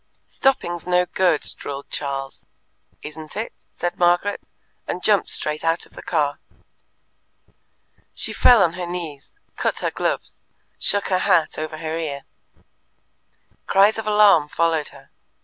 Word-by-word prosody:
"Stopping's 175 Hz, -11 st, 0 dB
no 180 Hz, 0 st, +3 dB
good," 180 Hz, -3 st, +2 dB, 0.2 s
drawled 140 Hz, 0 st, -7 dB
Charles. 135 Hz, -1 st, -4 dB, 0.6 s
"Isn't 155 Hz, +3 st, -9 dB
it?" 220 Hz, -, -4 dB, 0.2 s
said 175 Hz, 0 st, -3 dB
Margaret, 175 Hz, +3 st, +2 dB, 0.5 s
and 180 Hz, -, -4 dB
jumped 205 Hz, -3 st, +3 dB
straight 150 Hz, 0 st, -1 dB
out 165 Hz, +1 st, +1 dB
of -, -, -20 dB
the -, -, -10 dB
car. 145 Hz, -3 st, 0 dB, 1.8 s
She -, -, -4 dB
fell 240 Hz, -5 st, +6 dB
on 170 Hz, -2 st, +1 dB
her 180 Hz, -1 st, -5 dB
knees, 170 Hz, -, -7 dB, 0.2 s
cut -, -, 0 dB
her -, -, -1 dB
gloves, -, -, -3 dB, 0.4 s
shook 205 Hz, -1 st, +1 dB
her 185 Hz, -1 st, +2 dB
hat 180 Hz, -6 st, +2 dB
over 155 Hz, 0 st, -4 dB
her 160 Hz, +1 st, -3 dB
ear. 140 Hz, -4 st, -4 dB, 1.4 s
Cries 200 Hz, +3 st, +4 dB
of 220 Hz, -, -5 dB
alarm 210 Hz, -7 st, +5 dB
followed 165 Hz, -2 st, +1 dB
her. -, -, -17 dB
170 Hz, 135 wpm, -22 LUFS, 155-190 Hz, 1.8 s, fell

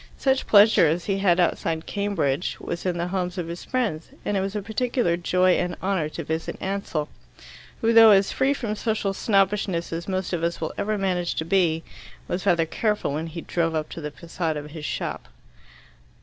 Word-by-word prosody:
Such 265 Hz, -1 st, +1 dB
pleasure 205 Hz, -4 st, +6 dB
as 165 Hz, +3 st, -1 dB
he 195 Hz, -1 st, 0 dB
had 185 Hz, -3 st, +3 dB
outside 165 Hz, -2 st, 0 dB
Cambridge 185 Hz, -7 st, -1 dB
was 170 Hz, +2 st, -4 dB
in 175 Hz, -1 st, 0 dB
the 170 Hz, +1 st, -2 dB
homes 180 Hz, -1 st, -2 dB
of 175 Hz, -2 st, -3 dB
his 170 Hz, +1 st, -6 dB
friends, 220 Hz, -12 st, -2 dB, 0.2 s
and 205 Hz, -, 0 dB
it -, -, +2 dB
was 195 Hz, +2 st, -3 dB
a 210 Hz, -, -1 dB
particular 220 Hz, -3 st, 0 dB
joy 180 Hz, +1 st, +2 dB
and 180 Hz, 0 st, -2 dB
honour 185 Hz, -5 st, -1 dB
to 165 Hz, -, -6 dB
visit 160 Hz, +2 st, -3 dB
Ansell, 190 Hz, -6 st, -2 dB, 0.7 s
who, 230 Hz, 0 st, +3 dB
though 225 Hz, -1 st, +9 dB
as 195 Hz, -1 st, +5 dB
free 275 Hz, +2 st, +1 dB
from 225 Hz, -6 st, -3 dB
social 215 Hz, -2 st, -1 dB
snobbishness 195 Hz, -4 st, +1 dB
as 170 Hz, +1 st, -4 dB
most 190 Hz, -1 st, -2 dB
of 170 Hz, -, -1 dB
us 170 Hz, 0 st, -1 dB
will 160 Hz, -, -3 dB
ever 215 Hz, +1 st, -1 dB
manage 180 Hz, -3 st, -1 dB
to 160 Hz, -, -2 dB
be, 165 Hz, -3 st, +2 dB, 0.4 s
was 180 Hz, -, -3 dB
rather 170 Hz, -2 st, +4 dB
careful 210 Hz, -3 st, -1 dB
when 155 Hz, +3 st, -3 dB
he 165 Hz, +1 st, -6 dB
drove 165 Hz, -1 st, -1 dB
up 155 Hz, -1 st, -2 dB
to 165 Hz, -, -7 dB
the 150 Hz, -, -4 dB
facade 165 Hz, +1 st, -4 dB
of 150 Hz, 0 st, -7 dB
his 155 Hz, -1 st, -7 dB
shop. -, -, -4 dB
180 Hz, 200 wpm, -24 LUFS, 165-200 Hz, 0.7 s, though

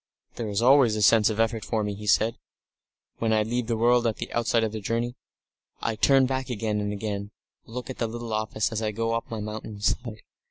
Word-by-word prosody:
"There 115 Hz, -2 st, -4 dB
is 105 Hz, +3 st, 0 dB
always 130 Hz, -3 st, +6 dB
a 105 Hz, -, 0 dB
sense 110 Hz, +1 st, +6 dB
of 110 Hz, 0 st, -3 dB
effort 115 Hz, -1 st, +1 dB
for 110 Hz, -2 st, -1 dB
me," 105 Hz, 0 st, -2 dB
he 105 Hz, +1 st, -8 dB
said, 110 Hz, +2 st, +3 dB, 0.8 s
"when 115 Hz, -1 st, +1 dB
I 110 Hz, -1 st, +3 dB
leave 120 Hz, +2 st, -2 dB
the 115 Hz, -2 st, 0 dB
world 120 Hz, +1 st, +4 dB
at 110 Hz, -, 0 dB
the -, -, -6 dB
outset 115 Hz, -1 st, +2 dB
of 110 Hz, -, 0 dB
the 110 Hz, -, -4 dB
journey. 115 Hz, +4 st, -2 dB, 0.6 s
I 115 Hz, -, -1 dB
turn 135 Hz, +4 st, +4 dB
back 130 Hz, 0 st, -2 dB
again 110 Hz, -2 st, -1 dB
and 105 Hz, 0 st, -2 dB
again, 100 Hz, -1 st, -4 dB
and -, -, -40 dB, 0.4 s
look 125 Hz, -, -4 dB
at -, -, -10 dB
the 115 Hz, -, 0 dB
little 115 Hz, 0 st, -5 dB
office 110 Hz, 0 st, -1 dB
as 110 Hz, 0 st, -2 dB
I 110 Hz, -1 st, -1 dB
go 115 Hz, +1 st, -1 dB
up 115 Hz, 0 st, -3 dB
my 115 Hz, -, -4 dB
mountain 105 Hz, 0 st, -6 dB
side. 110 Hz, +1 st, -2 dB
110 Hz, 235 wpm, -26 LUFS, 105-120 Hz, 0.8 s, always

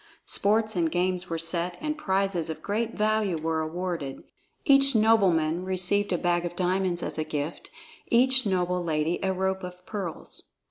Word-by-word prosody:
Sports 215 Hz, +1 st, +1 dB
and 165 Hz, -3 st, +1 dB
games 180 Hz, 0 st, -1 dB
were 165 Hz, -, -2 dB
set, 170 Hz, +2 st, -1 dB
and 305 Hz, 0 st, -2 dB
prizes 195 Hz, -, -1 dB
of 160 Hz, -, -6 dB
great 225 Hz, +3 st, -2 dB
value 215 Hz, -4 st, +1 dB
were 160 Hz, 0 st, -1 dB
awarded. 165 Hz, -3 st, -4 dB, 0.4 s
Each 275 Hz, -2 st, +5 dB
nobleman 185 Hz, -7 st, +3 dB
received 190 Hz, +2 st, +2 dB
a 175 Hz, -, +2 dB
bag 175 Hz, 0 st, +1 dB
of 175 Hz, 0 st, -4 dB
diamonds 180 Hz, -1 st, 0 dB
as -, -, -4 dB
a -, -, +1 dB
gift, 155 Hz, 0 st, -5 dB, 0.4 s
each 260 Hz, +2 st, +4 dB
noble 180 Hz, -3 st, 0 dB
lady 160 Hz, 0 st, 0 dB
a 190 Hz, -, 0 dB
rope 190 Hz, 0 st, -1 dB
of 180 Hz, 0 st, -9 dB
pearls. 195 Hz, -6 st, -7 dB
180 Hz, 165 wpm, -27 LUFS, 170-205 Hz, 0.4 s, Each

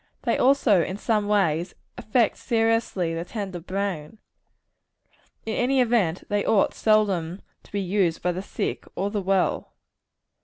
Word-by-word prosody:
They -, -, +1 dB
also, 250 Hz, -8 st, +4 dB
in 185 Hz, +4 st, -3 dB
some 210 Hz, -1 st, 0 dB
way, 175 Hz, -6 st, +2 dB, 0.3 s
affect 225 Hz, 0 st, +1 dB
seriously 225 Hz, -7 st, 0 dB
the 165 Hz, 0 st, -3 dB
tender 190 Hz, -2 st, -5 dB
brain. 185 Hz, -1 st, -4 dB, 1.3 s
In 220 Hz, -, -2 dB
any 260 Hz, +2 st, +2 dB
event, 225 Hz, -9 st, +1 dB
they 205 Hz, -1 st, 0 dB
ought 205 Hz, -, +2 dB
seldom 195 Hz, -5 st, +1 dB, 0.2 s
to -, -, -22 dB
be 200 Hz, -, -1 dB
used 185 Hz, -3 st, 0 dB
by 180 Hz, -, +2 dB
the 180 Hz, +2 st, -4 dB
sick -, -, -4 dB
or 200 Hz, +1 st, -2 dB
the 205 Hz, -1 st, -1 dB
well. 190 Hz, 0 st, 0 dB
200 Hz, 145 wpm, -25 LUFS, 180-220 Hz, 1.3 s, also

